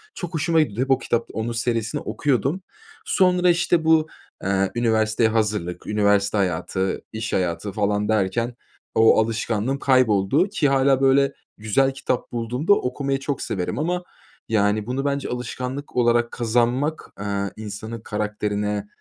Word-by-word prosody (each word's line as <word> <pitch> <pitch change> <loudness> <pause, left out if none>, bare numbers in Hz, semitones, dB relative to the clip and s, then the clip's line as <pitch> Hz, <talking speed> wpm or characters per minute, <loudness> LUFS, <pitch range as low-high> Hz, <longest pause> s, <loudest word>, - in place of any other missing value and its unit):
Çok 175 -1 -6
hoşuma 160 +1 +2
gitti. 115 -6 -2
Hep 135 +1 0
o 135 - +5
kitap 120 -2 -2
onun 110 +2 -2
serisini 115 +3 -1
okuyordum. 140 - 0 0.4
Sonra 180 -1 +3
işte 175 -1 +2
bu, 160 -1 +4 0.4
eee, 95 0 +1
üniversiteye 110 -1 +2
hazırlık, 105 -6 -1
üniversite 105 -1 +2
hayatı, 95 0 -1
iş 110 0 -4
hayatı 90 +2 -1
falan 105 +1 0
derken 110 +3 0 0.4
o 110 0 +6
alışkanlığım 115 +3 -1
kayboldu 130 - +3
ki 160 -8 +1
hâlâ 135 0 +3
böyle 135 +1 +4 0.2
güzel 110 +6 +2
kitap 130 -2 -3
bulduğumda 125 - +1
okumayı 135 -3 -1
çok 135 0 -3
severim 90 +5 -3
ama, 175 +3 -1 0.5
yani, 105 -1 +2
bunu 130 +3 -2
bence 140 -1 -1
alışkanlık 125 +3 -5
olarak 120 -1 +2
kazanmak, 125 +6 0
eee, 100 -1 -2
insanın 110 +2 -7
karakterine, 105 -1 -2
115 Hz, 135 wpm, -23 LUFS, 105-135 Hz, 0.5 s, o